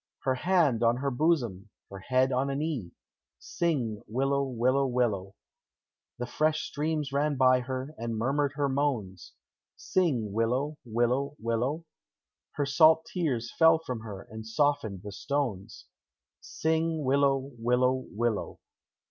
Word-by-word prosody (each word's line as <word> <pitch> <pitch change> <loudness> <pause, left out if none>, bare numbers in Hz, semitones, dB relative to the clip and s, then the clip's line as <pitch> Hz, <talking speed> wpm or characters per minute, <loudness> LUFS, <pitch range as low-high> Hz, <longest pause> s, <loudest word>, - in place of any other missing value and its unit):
Her 130 - +2
hand 155 -5 +2
on 120 +1 +3
her 140 +1 -1
bosom, 120 - 0 0.2
her 100 - -7
head 130 +6 +1
on 130 +2 +1
her 135 - -2
knee, 140 - -3 0.5
Sing 130 -11 -2
willow, 135 +5 0
willow, 130 +1 +1
willow; 110 -6 -1 0.8
The 125 - -3
fresh 155 +4 0
streams 150 -1 -2
ran 145 +1 +1
by 130 -1 +5
her, 130 +3 -5
and 115 -1 -3
murmured 140 +4 0
her 145 -1 +1
moans, 130 -10 -2 0.4
Sing 125 - 0
willow, 125 +7 0
willow, 120 +5 0
willow; 125 +8 -2 0.7
Her 145 - -1
salt 155 +4 +5
tears 130 -10 -1
fell 160 0 +7
from 130 -7 -5
her, 105 -3 -8
and 110 0 -9
softened 110 -6 0
the 105 - -7
stones; 110 - -3 0.5
Sing 160 0 -1
willow, 135 0 +2
willow, 125 +2 +1
willow. 115 0 -2
130 Hz, 130 wpm, -28 LUFS, 115-145 Hz, 0.8 s, fell